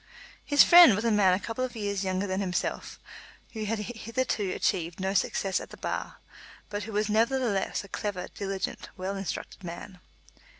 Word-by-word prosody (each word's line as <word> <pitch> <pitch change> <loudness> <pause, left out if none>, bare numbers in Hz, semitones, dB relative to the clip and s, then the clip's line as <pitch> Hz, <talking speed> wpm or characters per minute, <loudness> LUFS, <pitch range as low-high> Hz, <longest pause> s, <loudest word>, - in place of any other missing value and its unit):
His 285 -1 +6
friend 345 - +9
was 210 +4 -2
a 230 - +3
man 195 -3 +4
a - - -3
couple 230 +4 -4
of 255 -1 -4
years 200 -2 -2
younger 185 +1 -1
than 190 -1 -2
himself, 180 -3 -3 0.6
who 220 -2 -4
had 225 +2 -1
hitherto 225 -1 -2
achieved 170 -1 -1
no 190 +1 -1
success 195 0 0
at - - -9
the - - -12
Bar, - - -4 0.5
but 205 -1 -3
who 225 - -7
was 210 0 0
nevertheless 225 -2 +1
a - - -11
clever, 190 -2 -4
diligent, 195 -1 -4
well 190 +2 -3
instructed 195 0 -5
man. 180 +2 -8
200 Hz, 175 wpm, -28 LUFS, 190-225 Hz, 0.6 s, friend